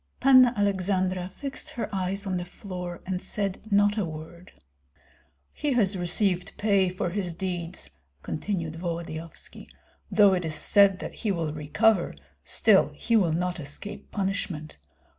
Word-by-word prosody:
Panna 255 -2 +7
Aleksandra 185 -2 0
fixed 275 -1 -4
her 240 - -3
eyes 195 +2 -1
on 185 -2 -1
the 175 - -3
floor, 180 -1 -7
and 185 -1 -2
said 200 -2 -2
not 205 +1 +3
a - - +1
word. 165 +2 -8 1.0
"He 295 -2 -1
has 210 -5 +2
received 180 +1 0
pay 200 -3 +3
for 180 -1 -3
his 180 -3 -2
deeds," 175 - -4 0.3
continued 165 -3 -3
Volodyovski, 165 -1 -6 0.4
"though 205 -2 +6
it 180 -1 0
is 160 -1 -2
said 200 +1 +5
that - - -6
he 215 - -2
will 165 -5 -2
recover, 175 +6 +2 0.3
still - - +4
he 230 - 0
will 185 -7 +4
not 180 +1 -1
escape 160 +8 -6
punishment. 190 - -3
185 Hz, 140 wpm, -27 LUFS, 170-205 Hz, 1.0 s, Panna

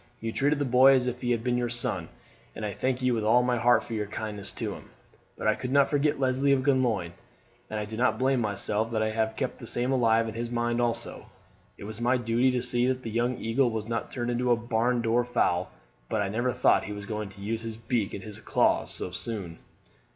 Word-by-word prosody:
You 115 0 -3
treated 145 +5 +1
the 145 - 0
boy 130 +2 +6
as 125 -1 +2
if 125 0 -3
he 120 - -2
had 115 -2 +1
been 125 0 +1
your 120 -1 -1
son, 120 0 -3 0.5
and 110 - -4
I 105 - -3
thank 130 +4 -1
you 130 -1 +3
with 110 -2 -1
all 120 +3 +4
my 125 0 +1
heart 120 +2 +4
for 115 - -8
your 105 -2 -2
kindness 105 -1 -5
to - - -3
him; - - -12 0.5
but - - -6
I 110 - +4
could 125 +3 -5
not 140 0 +4
forget 145 0 +1
Leslie 135 +1 +2
of 130 -1 +1
Glenlyon, 120 -11 +1 0.6
and 110 - -3
I 105 - -3
do 110 +1 -7
not 125 -2 +2
blame 130 +1 +2
myself 105 +1 0
that 110 -1 +1
I 110 - 0
have 110 0 -1
kept 130 - -3
the 115 - -9
same 125 +3 0
alive 115 -3 +3
in 110 - -5
his 115 +1 -4
mind 120 0 0
also. 120 -1 -2 0.5
It - - -10
was 110 +2 -7
my 125 +2 +3
duty 120 +2 +2
to 125 -1 0
see 120 0 +2
that 130 0 -1
the 115 - -5
young 120 +2 0
eagle 120 +3 +1
was 110 -1 -4
not 115 0 -3
turned 120 -1 -3
into 125 +1 0
a 120 - +6
barn 120 +1 0
door 115 +1 +2
fowl; 90 -7 0 0.4
but 110 - 0
I 100 - -2
never 120 +5 0
thought - - +3
he 105 - -5
was 105 0 -7
going 105 -1 -4
to 100 0 -14
use 110 +3 -2
his 115 -1 -6
beak 115 -2 -1
and 95 - -7
his 105 -1 -7
claws - - +1
so 90 - -5
soon." 90 -3 -6
120 Hz, 245 wpm, -27 LUFS, 110-125 Hz, 0.6 s, boy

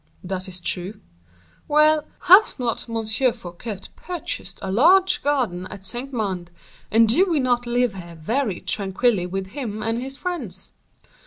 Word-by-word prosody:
"That 185 0 -3
is 180 -1 -2
true." 180 +4 -4 0.7
"Well, 305 0 +4 0.2
has 380 +5 +6
not 240 -2 -2
M. 225 -1 -2 0.3
Fouquet 200 -1 -8
purchased 360 -1 -5
a 190 - -2
large 365 - +5
garden 245 -11 0
at 195 -2 -10
Saint 240 +8 -2
Mande, 190 -8 -3 0.4
and 225 +1 +5
do 355 - +3
we 325 -4 +2
not 245 -2 +1
live 245 -2 +1
here 170 -3 -9
very 220 - -1
tranquilly 200 -1 0
with 190 +1 -4
him 215 -3 -5
and 225 +2 -1
his 270 +1 -3
friends?" 275 - -5
225 Hz, 150 wpm, -23 LUFS, 190-270 Hz, 0.7 s, has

